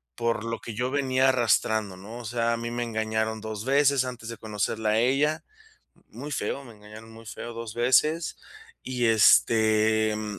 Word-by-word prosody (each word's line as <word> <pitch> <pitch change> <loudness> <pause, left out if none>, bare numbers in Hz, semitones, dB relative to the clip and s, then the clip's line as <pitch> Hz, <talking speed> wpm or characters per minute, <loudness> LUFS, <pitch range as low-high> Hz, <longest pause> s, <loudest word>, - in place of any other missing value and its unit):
por 115 -1 -1
lo 115 0 -3
que 115 - -7
yo 125 +4 -2
venía 130 -2 +2
arrastrando, 110 -5 +1
¿no? 110 +6 -9
O 120 - -9
sea, 115 +1 0
a - - -1
mí 115 0 -5
me 120 0 -2
engañaron 110 -1 -2
2 110 0 -6
veces 140 -1 +3
antes 125 -3 -7
de 115 - -7
conocerla 110 0 -2
a 110 - +2
ella. 140 +6 +1 0.7
Muy 145 +1 -8
feo, 140 -1 -3
me 120 - -12
engañaron 110 +1 -13
muy 115 0 -14
feo 120 +2 -7
2 115 -1 -7
veces. 150 +7 +2 0.5
Y 125 -2 -1
este, 110 0 +4
mm, 105 -2 -5
115 Hz, 180 wpm, -26 LUFS, 110-125 Hz, 0.7 s, este